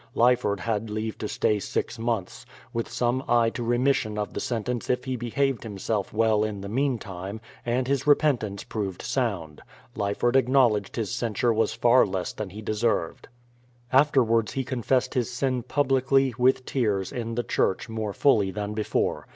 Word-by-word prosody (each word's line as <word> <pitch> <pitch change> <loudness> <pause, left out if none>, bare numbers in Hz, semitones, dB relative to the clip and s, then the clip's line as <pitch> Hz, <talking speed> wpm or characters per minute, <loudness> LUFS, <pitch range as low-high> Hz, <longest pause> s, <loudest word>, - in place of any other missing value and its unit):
Ly 125 +2 +5
ford 100 -6 -2
had 110 0 -2
leave 110 +1 -3
to 105 - -3
stay 105 0 +1
six 115 +3 -3
months, 115 -5 -2 0.2
— 120 -1 -25
with 115 -1 -2
some 120 +2 0
eye 115 -1 +3
to - - -5
remis 125 +4 +2
sion 110 -3 -4
of 105 -1 -3
the - - -3
sentence 120 0 -3
if 125 0 0
he 130 -1 -2
behaved 125 +2 -1
himself 105 -1 -3
well 110 -1 +2
in 105 -2 -3
the 100 - -6
mean 130 +4 0
time, 95 +1 -7 0.3
and 125 +2 0
his 140 +1 0
repentance 130 -9 +2
proved 100 -4 -4
sound. 95 - -2 0.3
Lyford 105 +3 0
acknowl 130 -3 +4
edged 100 -1 -8
his 115 -3 -2
censure 120 -1 0
was 110 -1 +1
far 120 +2 +5
less 95 -2 -3
than 110 -3 -5
he 105 +4 -9
deserved. 110 -6 -1 0.7
Afterwards 125 -5 +3
he 135 - -1
confessed 130 0 0
his 125 -4 0
sin 130 0 -1
publicly, 135 0 +2
with 130 +1 +2
tears, 105 -7 0
in 115 -2 -4
the 120 - 0
church, 95 0 0
more 110 -2 -3
fully 105 -4 +3
than 105 +1 -4
before. 105 0 -1
115 Hz, 180 wpm, -26 LUFS, 105-125 Hz, 0.7 s, Ly